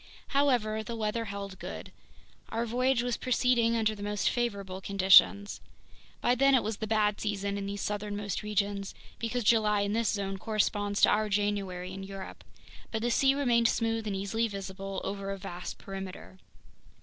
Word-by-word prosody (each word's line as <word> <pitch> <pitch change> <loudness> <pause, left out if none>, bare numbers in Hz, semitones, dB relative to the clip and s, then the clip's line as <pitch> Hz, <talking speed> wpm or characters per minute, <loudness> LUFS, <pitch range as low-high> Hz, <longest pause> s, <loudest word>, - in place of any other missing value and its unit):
However, 245 -6 +2
the 230 +2 -5
weather 225 +1 -1
held 200 -2 -6
good. - - -7 0.6
Our 230 +1 -1
voyage 250 +1 +1
was 245 -1 -1
proceeding 245 -2 +2
under 220 -1 +1
the 205 - -10
most 205 0 0
favorable 200 -6 -2
conditions. 200 +1 +5 0.6
By 245 - +3
then 275 +2 +4
it 255 - +3
was 215 0 -3
the 220 - -4
bad 210 -1 +1
season 200 -1 -2
in 200 0 -3
these 200 0 -4
southernmost 205 -2 -3
regions, 205 -1 -2 0.2
because 235 +1 -2
July 210 -2 +3
in 200 0 -1
this 230 -1 +1
zone 195 -2 -2
corresponds 205 -1 0
to - - +7
our 215 0 +2
January 195 -3 -1
in 195 - -6
Europe; 195 0 -8 0.5
but 220 0 -3
the 240 - +1
sea 270 +3 +4
remained 240 -5 +3
smooth 225 -1 0
and 200 - -1
easily 200 +4 0
visible 195 -1 -5
over 195 0 -4
a 195 - -3
vast 180 -2 -7
perimeter. 185 - -8
210 Hz, 170 wpm, -30 LUFS, 195-230 Hz, 0.6 s, to